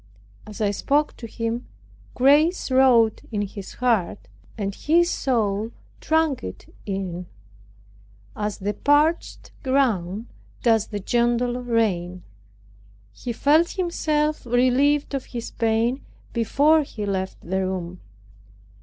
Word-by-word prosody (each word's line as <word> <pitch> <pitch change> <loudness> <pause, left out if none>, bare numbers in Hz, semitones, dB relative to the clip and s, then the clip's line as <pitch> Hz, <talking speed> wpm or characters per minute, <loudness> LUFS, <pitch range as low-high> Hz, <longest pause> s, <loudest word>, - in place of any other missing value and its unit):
As 215 0 -8
I 205 -1 +2
spoke 290 +8 0
to 230 - -8
him 230 +2 -4 0.5
grace 290 +5 +3
wrought 250 -4 +4
in 205 -2 -1
his 200 -1 -8
heart, 230 -7 0 0.3
and 200 -2 -2
his 340 - +2
soul 220 -5 0 0.3
drank 315 -4 +1
it - - -9
in, 185 -3 -4 1.1
as 210 -1 -3
the 205 +2 -2
parched 300 +6 +1
ground 225 -7 0 0.4
does 225 -3 +3
the 205 - -4
gentle 240 +3 0
rain. 185 -7 -1 0.9
He 240 - -5
felt 305 +8 +3
himself 310 -4 0
relieved 255 +5 +2
of 270 -2 -2
his 235 -2 -6
pain 230 +3 0 0.3
before 285 +7 +3
he 220 -7 -6
left 190 -1 -3
the 190 +2 -2
room. 185 -1 -4
235 Hz, 115 wpm, -23 LUFS, 205-280 Hz, 1.1 s, wrought